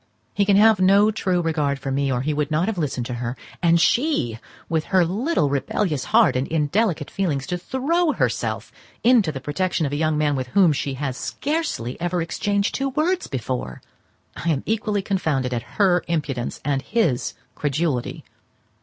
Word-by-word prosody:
He 200 Hz, -, +2 dB
can 200 Hz, -1 st, +4 dB
have 215 Hz, -1 st, +6 dB
no 200 Hz, +3 st, +5 dB
true 185 Hz, -4 st, 0 dB
regard 150 Hz, -4 st, 0 dB
for 135 Hz, 0 st, -5 dB
me, 140 Hz, 0 st, 0 dB
or 125 Hz, -1 st, 0 dB
he 150 Hz, +3 st, -1 dB
would 150 Hz, 0 st, -1 dB
not 155 Hz, +3 st, +1 dB
have 210 Hz, -3 st, -2 dB
listened 135 Hz, -6 st, -2 dB
to 125 Hz, -, -4 dB
her; 120 Hz, +1 st, -3 dB, 0.2 s
and 170 Hz, -1 st, +4 dB
she, 175 Hz, -, +1 dB, 0.3 s
with 160 Hz, -2 st, -1 dB
her 185 Hz, -2 st, +3 dB
little 210 Hz, -, 0 dB
rebellious 145 Hz, 0 st, -1 dB
heart -, -, +4 dB
and 130 Hz, +2 st, 0 dB
indelicate 160 Hz, +1 st, 0 dB
feelings, 150 Hz, -9 st, -1 dB
to 180 Hz, -, -2 dB
throw 305 Hz, -, 0 dB
herself -, -, -1 dB, 0.3 s
into 230 Hz, -9 st, +4 dB
the 135 Hz, -, -6 dB
protection 165 Hz, +4 st, -1 dB
of 140 Hz, -, -2 dB
a -, -, -1 dB
young 155 Hz, 0 st, +1 dB
man 150 Hz, -1 st, +1 dB
with 130 Hz, -1 st, -3 dB
whom 175 Hz, +3 st, +4 dB
she 135 Hz, -1 st, -3 dB
has 135 Hz, -1 st, -3 dB
scarcely 290 Hz, -, -3 dB
ever 175 Hz, +1 st, 0 dB
exchanged 200 Hz, +4 st, -1 dB
two 275 Hz, 0 st, -1 dB
words 340 Hz, +7 st, 0 dB
before! 125 Hz, -, -4 dB, 0.6 s
I 170 Hz, -, -3 dB
am 145 Hz, -4 st, 0 dB
equally 210 Hz, -2 st, -1 dB
confounded 155 Hz, -10 st, -1 dB
at 120 Hz, -1 st, -6 dB
her 185 Hz, -4 st, +3 dB
impudence 145 Hz, -7 st, -2 dB
and 140 Hz, -1 st, 0 dB
his 185 Hz, -, 0 dB, 0.2 s
credulity. 145 Hz, -3 st, -2 dB
165 Hz, 180 wpm, -22 LUFS, 140-200 Hz, 0.6 s, have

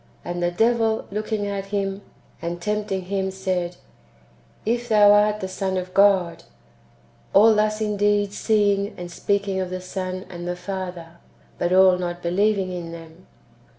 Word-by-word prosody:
"^ -, -, -33 dB, 0.2 s
And 175 Hz, 0 st, -4 dB
the 175 Hz, -, +2 dB
devil 225 Hz, +3 st, +1 dB
looking 215 Hz, 0 st, -2 dB
at 200 Hz, -1 st, -4 dB
Him, 195 Hz, -1 st, -2 dB, 0.4 s
and 170 Hz, +1 st, -4 dB
tem.pting 210 Hz, 0 st, -2 dB
Him, 190 Hz, +1 st, -2 dB
said: 185 Hz, -2 st, -2 dB
^' -, -, -23 dB, 0.9 s
If 240 Hz, +2 st, -1 dB
thou 210 Hz, -2 st, +6 dB
art 210 Hz, +1 st, +3 dB
the 190 Hz, -, -2 dB
Son 190 Hz, 0 st, -2 dB
of 185 Hz, 0 st, -5 dB
God;"^ 190 Hz, -4 st, +3 dB, 0.5 s
— -, -, -32 dB
all 220 Hz, +3 st, +7 dB
thus 215 Hz, 0 st, +1 dB
indeed 205 Hz, -1 st, +1 dB
seeing 205 Hz, -2 st, +1 dB
and 175 Hz, 0 st, -7 dB
speaking 200 Hz, +1 st, -1 dB
of 185 Hz, -1 st, -2 dB
the 185 Hz, 0 st, -4 dB
Son 185 Hz, 0 st, -5 dB
and 175 Hz, -1 st, -7 dB
the 180 Hz, -, -2 dB
Father, 180 Hz, -2 st, -6 dB, 0.4 s
but 175 Hz, -, 0 dB
all 185 Hz, -1 st, +6 dB
not 175 Hz, -1 st, -4 dB
believing 190 Hz, +2 st, +1 dB
[in 175 Hz, -2 st, -6 dB
them]. 165 Hz, +1 st, -12 dB
190 Hz, 165 wpm, -23 LUFS, 180-205 Hz, 0.9 s, all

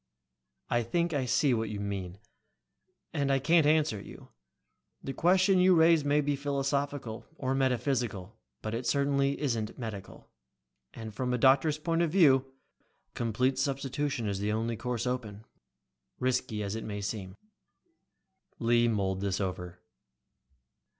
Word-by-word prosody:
"I 120 Hz, -, +1 dB
think 170 Hz, +9 st, -1 dB
I 140 Hz, -3 st, 0 dB
see 130 Hz, +2 st, +2 dB
what 110 Hz, -2 st, -1 dB
you 105 Hz, -1 st, -5 dB
mean. 100 Hz, -3 st, -4 dB, 1.0 s
And 140 Hz, -1 st, 0 dB
I 135 Hz, -, +4 dB
can't 160 Hz, +3 st, +3 dB
answer 150 Hz, -9 st, +2 dB
you. -, -, -12 dB, 0.7 s
The 135 Hz, -, -4 dB
question 185 Hz, +3 st, +3 dB
you 180 Hz, 0 st, +5 dB
raise 165 Hz, -1 st, +5 dB
may 145 Hz, +1 st, +2 dB
be 145 Hz, 0 st, 0 dB
philosophical, 140 Hz, -3 st, -2 dB
or 130 Hz, 0 st, -1 dB
metaphysical, 125 Hz, -7 st, -1 dB, 0.3 s
but 110 Hz, -, -3 dB
it 120 Hz, +2 st, -3 dB
certainly 140 Hz, -1 st, +1 dB
isn't 115 Hz, -7 st, -2 dB
medical. 105 Hz, -6 st, -8 dB, 0.6 s
And 110 Hz, -2 st, -7 dB
from 125 Hz, +3 st, -1 dB
a -, -, -1 dB
doctor's 135 Hz, +4 st, +4 dB
point 165 Hz, +2 st, 0 dB
of 170 Hz, -, +2 dB
view 135 Hz, -7 st, +4 dB, 0.6 s
complete 125 Hz, +3 st, 0 dB
substitution 135 Hz, -2 st, -2 dB
is 100 Hz, -1 st, -2 dB
the 105 Hz, +1 st, -1 dB
only 115 Hz, +2 st, -1 dB
course 125 Hz, +1 st, -3 dB
open, 110 Hz, -4 st, -4 dB, 0.7 s
risky 125 Hz, -4 st, -1 dB
as 100 Hz, 0 st, -3 dB
it 110 Hz, -, -4 dB
may 105 Hz, -1 st, -5 dB
seem." 100 Hz, -2 st, -5 dB, 1.2 s
Lee 120 Hz, 0 st, +3 dB
mulled 95 Hz, -4 st, -1 dB
this 100 Hz, -1 st, -1 dB
over. 90 Hz, -2 st, -5 dB
125 Hz, 140 wpm, -30 LUFS, 110-140 Hz, 1.2 s, you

